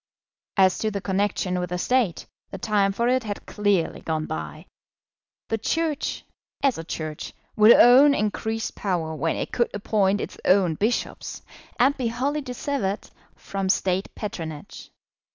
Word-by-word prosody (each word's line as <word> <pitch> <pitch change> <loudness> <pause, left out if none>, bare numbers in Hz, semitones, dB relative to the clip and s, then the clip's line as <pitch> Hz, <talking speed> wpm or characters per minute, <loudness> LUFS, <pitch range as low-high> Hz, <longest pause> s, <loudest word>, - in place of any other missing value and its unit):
As 190 -1 +4
to 220 - 0
the 200 -1 -3
connection 190 -2 -1
with 180 -1 -3
the 180 - -2
State, 235 -2 0 0.2
the 195 - -7
time 200 -1 +1
for 235 +4 0
it 255 +1 +2
had 205 -2 -6
clearly 205 -5 0
gone 155 -1 -2
by. 160 +1 -6 0.8
The 225 - -1
Church, 315 +4 -2 0.4
as 270 -10 +2
a - - -5
Church, 155 -2 -6 0.2
would 215 +1 +7
own 270 +4 +7
increased 220 +1 -2
power 170 -5 -2
when 160 +2 -1
it - - -4
could 235 - +1
appoint 205 -1 +1
its - - -6
own 185 -3 +4
bishops, 215 +9 -2 0.4
and 270 +3 +4
be 255 -4 -1
wholly 270 +6 -1
dissevered 250 -6 -3 0.2
from 195 -1 -4
State 190 0 +1
patronage. 160 -8 -7
205 Hz, 150 wpm, -24 LUFS, 180-235 Hz, 0.8 s, would